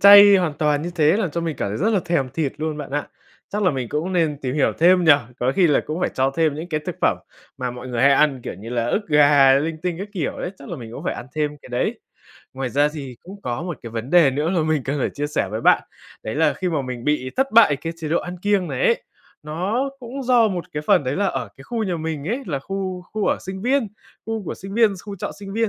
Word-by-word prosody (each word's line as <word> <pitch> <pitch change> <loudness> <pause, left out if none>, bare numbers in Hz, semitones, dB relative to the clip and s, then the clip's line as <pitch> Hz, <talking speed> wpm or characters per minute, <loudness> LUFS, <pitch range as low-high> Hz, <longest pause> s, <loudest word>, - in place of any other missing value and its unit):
chay 200 0 +10
hoàn 175 -5 +1
toàn 150 -1 +1
như 175 - -3
thế, 160 +2 +4
làm 190 -8 -1
cho 170 - -2
mình 160 -4 -3
cảm - - -2
thấy 105 - -3
rất 215 +7 +2
là 200 - +2
thèm 170 -7 0
thịt 150 -5 -1
luôn 155 0 -3
bạn 150 - -7
ạ. 145 0 -2 0.4
Chắc 210 +1 -2
là 180 - +4
mình 130 -4 -3
cũng 160 +8 -2
nên 160 -5 +1
tìm 130 +1 -2
hiểu 150 - +2
thêm 180 +1 +5
nhỉ, 160 - +8 0.3
có 130 +2 +1
khi 185 -3 +5
là 150 - +3
cũng 155 +3 -3
phải - - 0
cho 135 +1 +2
thêm 160 -3 +2
những 160 +4 -6
cái 155 -2 -1
thực - - -4
phẩm - - +2 0.4
mà 125 -1 -2
mọi 125 +1 -8
người 120 -1 -1
hay 140 0 +6
ăn 140 -2 +3
kiểu - - -5
như 105 +5 -10
là 120 -1 -1
ức 205 - -1
gà, 145 -2 +6
linh 160 +2 -3
tinh 180 -2 -1
các 200 +2 -5
kiểu 175 -7 -2
đấy, - - -3
chắc 140 - -11
là - - -5
mình 115 -3 -9
cũng - - -8
phải - - -1
ăn - - -8
thêm 150 -1 -1
cái - - -13
đấy. 120 0 -2 0.5
Ngoài 130 -1 -3
ra 145 +2 +3
gì 140 -5 -8
cũng 200 +2 -12
có 120 +2 -3
một 175 -3 -5
cái 115 - -7
vấn 115 +3 -5
đề 170 -6 +6
nữa 150 +5 -1
mà 175 -4 +1
mình 155 -2 0
cần 140 +2 -2
phải - - 0
chia 145 +1 -3
sẻ 145 -9 -1
với 110 +2 -3
bạn, - - +4 0.4
đấy 110 - -4
là 160 +2 +3
khi 185 - -3
mà 155 -5 -1
mình 125 -2 -6
bị 150 -4 0
thất 270 -1 +1
bại 215 -11 +6
cái 165 +4 -5
chế 160 -2 -5
độ 170 - +2
ăn 180 +1 -6
kiêng 200 -1 +1
này - - 0
ấy, 485 +1 +2 0.4
nó 195 - -2
cũng 260 +3 -6
do 240 -3 +4
một 180 -3 -3
cái 150 - -3
phần 140 - +4
đấy 130 +2 -1
là 200 0 +1
ở 125 - -2
cái 135 - -13
khu 230 +4 -3
nhà 180 -4 -1
mình 160 -1 -4
ấy, 255 +5 -2
là 145 -7 -2
khu 185 +4 -4
khu 215 -1 -1
ở - - +2
sinh 190 +1 -7
viên 255 -3 +1 0.4
khu 225 -2 -3
của - - -4
sinh 195 +2 -9
viên 225 -3 +4
xu 200 +2 -8
trọ - - -4
sinh 195 -1 -7
viên. 225 0 +1
160 Hz, 285 wpm, -22 LUFS, 140-195 Hz, 0.5 s, chay